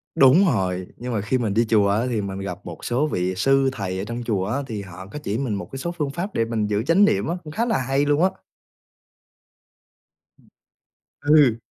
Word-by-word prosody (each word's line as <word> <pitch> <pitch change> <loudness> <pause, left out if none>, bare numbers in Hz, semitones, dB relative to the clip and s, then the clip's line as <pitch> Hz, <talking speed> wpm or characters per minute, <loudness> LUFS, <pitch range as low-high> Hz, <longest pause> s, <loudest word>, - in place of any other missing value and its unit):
đúng 135 +9 +6
rồi. 95 - 0
Nhưng 125 0 -5
mà 105 - 0
khi 110 +6 0
mình 110 -5 -1
đi 115 +3 +3
chùa 105 -3 +4
á, 105 +3 +2
thì 115 -4 -1
mình 100 -1 -5
gặp 90 -2 -5
một 85 -2 -8
số 130 +5 +1
vị 90 -8 -1
sư 135 +7 +3
thầy 95 -6 -4
ở 95 - -3
trong 120 +2 -5
chùa 105 -5 -1
á, 110 +7 -1
thì 110 -4 -4
họ 95 -1 -10
có 150 - -7
chỉ 105 -3 -2
mình 125 -4 -2
một 90 -3 -6
cái 135 - -6
số 170 +5 -3
phương 155 -5 -3
pháp 185 +7 -4
để 115 - +1
mình 110 -2 -1
giữ 105 +1 0
chánh 170 - +5
niệm 100 - +1
á, 170 - -1
cũng 155 - -9
khá 230 +6 0
là 225 -3 +1
hay 135 +2 0
luôn 145 +3 +2
á. 190 - +5 2.9
Ừ. 145 -6 +4
115 Hz, 225 wpm, -23 LUFS, 100-140 Hz, 2.9 s, đúng